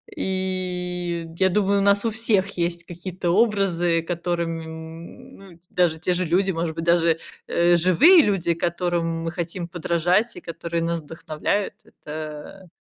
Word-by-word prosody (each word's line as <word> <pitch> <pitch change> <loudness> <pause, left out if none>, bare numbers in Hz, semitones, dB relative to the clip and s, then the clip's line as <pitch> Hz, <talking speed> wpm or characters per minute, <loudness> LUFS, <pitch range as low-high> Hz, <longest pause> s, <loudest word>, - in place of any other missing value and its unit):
И 180 -2 -2
я 190 0 +4
думаю, 200 +1 +2
у - - +1
нас 200 +2 +3
у - - +3
всех 210 -3 0
есть 170 0 -1
какие-то 175 +1 -5
образы, 180 -5 +2
которым, 165 +5 -5
м, 170 - -18
даже 170 -3 +1
те 180 - 0
же 180 +1 0
люди, 190 +4 +2
может 165 -2 -2
быть, 165 - -4
даже, 170 -1 +3 0.3
э, 175 0 +3
живые 185 - +7
люди, 185 -4 +1
которым 170 -1 -1
мы 165 - -2
хотим 175 0 -4
подражать 175 +5 +1
и - - -9
которые 170 0 -4
нас 170 0 -1
вдохновляют, 160 +5 -3
это 155 +4 -8
175 Hz, 145 wpm, -23 LUFS, 165-190 Hz, 0.3 s, живые